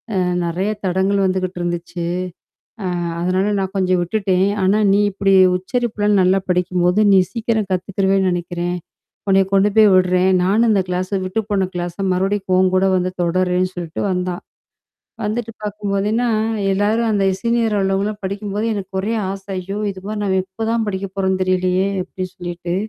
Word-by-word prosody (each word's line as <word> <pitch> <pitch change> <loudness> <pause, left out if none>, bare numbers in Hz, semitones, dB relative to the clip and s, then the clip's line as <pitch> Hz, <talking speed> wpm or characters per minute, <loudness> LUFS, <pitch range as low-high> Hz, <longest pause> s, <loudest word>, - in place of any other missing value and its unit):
அ - - +1 0.3
நெறையா 185 +5 -1
தடங்கள் 190 +2 +1
வந்துகிட்டு 185 -1 -1
இருந்துச்சு. 175 0 -3 0.8
அ - - 0 0.3
அதனால 185 +4 +1
நான் 190 0 -3
கொஞ்சம் 185 -1 +2
விட்டுட்டேன். 190 0 +1 0.2
ஆனா 200 +3 +3
நீ 200 - +3
இப்படி 195 0 +1 0.2
உச்சரிப்புலாம் 210 -1 0
நல்லா 185 +1 +3
படிக்கும்போது, 180 +1 +1
நீ 190 - +7
சீக்கிரம் 220 -3 -1
கத்துக்கிறவேன்னு 190 +1 +1
நெனைக்கிறேன். 175 0 -3 0.5
உன்னைய 195 0 +4
கொண்டு 195 +1 +4
போய் 215 -2 +7
விடுறேன்" 185 0 +3
நானும் 220 +5 +3
இந்த 195 -3 +2
கிளாஸ 180 +1 -2 0.2
விட்டு 185 +4 -2
போன 190 -2 +1
கிளாஸ 175 -1 -3 0.2
மறுபடியும் 195 +1 -1
உன் 185 0 +3
கூட 190 +1 +3
வந்து 180 0 -1
தொடர்றேன்னு 185 +1 +1
சொல்லிட்டு 170 -3 -4
வந்தா. 180 -1 -1 0.9
வந்துட்டு 230 +2 -2
பாக்கும்போதுே 205 -1 -2
என்னா, 240 +2 +1 0.5
எல்லாரும் 215 +4 +1
அந்த 200 -1 +1 0.2
சீனியர் 230 -2 +1
அளவுல 195 +2 0
படிக்கும்போது 205 +2 -3
எனக்கு 195 -1 -6
ஒரே 215 +4 -2 0.2
ஆசை, 195 0 -7
"ஐயோ! 195 +3 -5
இது 190 -1 -12
மாதிரி 215 -1 -3
நாம 190 -1 +1
எப்ப 205 +4 -6
தான் 225 -2 0
படிக்க 195 0 -3
போறோம்ன்னு 190 -1 0
தெரியலையே!" 185 +1 +1 0.2
அப்டி 185 0 -5
சொல்லிட்டு. 175 0 -5
190 Hz, 155 wpm, -19 LUFS, 185-205 Hz, 0.9 s, நீ